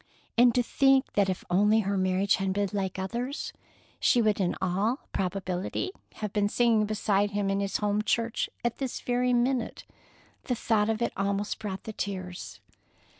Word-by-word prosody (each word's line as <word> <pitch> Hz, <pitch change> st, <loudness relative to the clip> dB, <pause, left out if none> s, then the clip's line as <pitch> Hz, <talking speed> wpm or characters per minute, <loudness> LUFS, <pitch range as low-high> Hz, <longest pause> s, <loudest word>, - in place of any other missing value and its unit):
And 240 Hz, 0 st, +5 dB
to 250 Hz, -, +3 dB
think 270 Hz, +2 st, +3 dB
that 200 Hz, -2 st, +3 dB
if 185 Hz, -, -2 dB
only 210 Hz, +4 st, +4 dB
her 200 Hz, 0 st, -1 dB
marriage 185 Hz, +1 st, +2 dB
had 195 Hz, -1 st, -1 dB
been 200 Hz, 0 st, 0 dB
like 195 Hz, -2 st, -2 dB
others, 235 Hz, +9 st, -3 dB, 0.5 s
she 245 Hz, -, +4 dB
would 215 Hz, -3 st, +2 dB
in 180 Hz, -3 st, +1 dB
all 195 Hz, -, 0 dB
probability 190 Hz, -, -2 dB, 0.2 s
have 210 Hz, -2 st, -4 dB
been 205 Hz, -1 st, +2 dB
singing 225 Hz, -2 st, +3 dB
beside 205 Hz, -1 st, +1 dB
him 205 Hz, -1 st, -1 dB
in 195 Hz, -, 0 dB
his 200 Hz, -1 st, 0 dB
home 210 Hz, 0 st, +1 dB
church 230 Hz, +1 st, 0 dB, 0.2 s
at 240 Hz, -, -1 dB
this 265 Hz, -3 st, -3 dB
very 250 Hz, 0 st, +1 dB
minute! 245 Hz, 0 st, 0 dB, 0.6 s
The 250 Hz, -, 0 dB
thought 220 Hz, -2 st, +1 dB
of 225 Hz, +1 st, 0 dB
it -, -, -1 dB
almost 200 Hz, +1 st, -1 dB
brought 195 Hz, -3 st, -5 dB
the 220 Hz, -, -6 dB
tears. 185 Hz, -3 st, -5 dB
205 Hz, 175 wpm, -28 LUFS, 195-235 Hz, 0.6 s, And